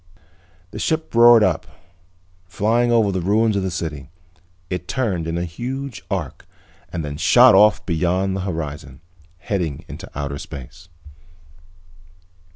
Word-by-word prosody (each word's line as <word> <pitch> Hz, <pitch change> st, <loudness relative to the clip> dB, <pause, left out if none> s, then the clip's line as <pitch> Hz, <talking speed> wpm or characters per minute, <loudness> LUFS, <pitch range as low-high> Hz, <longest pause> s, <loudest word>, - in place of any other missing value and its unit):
The -, -, -7 dB
ship 160 Hz, 0 st, -2 dB
roared 115 Hz, -1 st, +7 dB
up, -, -, 0 dB, 0.8 s
flying 115 Hz, +6 st, +1 dB
over 110 Hz, -4 st, +3 dB
the 95 Hz, -1 st, -2 dB
ruins 105 Hz, +4 st, +2 dB
of 100 Hz, -, 0 dB
the 95 Hz, -, -2 dB
city. 80 Hz, -5 st, -5 dB, 0.6 s
It 90 Hz, -1 st, -5 dB
turned 100 Hz, -11 st, -2 dB
in 80 Hz, +1 st, -2 dB
a 85 Hz, -, -2 dB
huge 125 Hz, +8 st, -6 dB
arc 90 Hz, -9 st, -4 dB, 0.4 s
and 85 Hz, -3 st, -4 dB
then 70 Hz, 0 st, -6 dB
shot 120 Hz, +10 st, +6 dB
off 105 Hz, -2 st, +5 dB
beyond 90 Hz, +3 st, 0 dB
the 95 Hz, -, -3 dB
horizon, 75 Hz, -6 st, -6 dB, 0.4 s
heading 85 Hz, -5 st, -3 dB
into -, -, -9 dB
outer 70 Hz, -1 st, -4 dB
space. 85 Hz, +9 st, -10 dB
90 Hz, 135 wpm, -21 LUFS, 80-110 Hz, 0.8 s, roared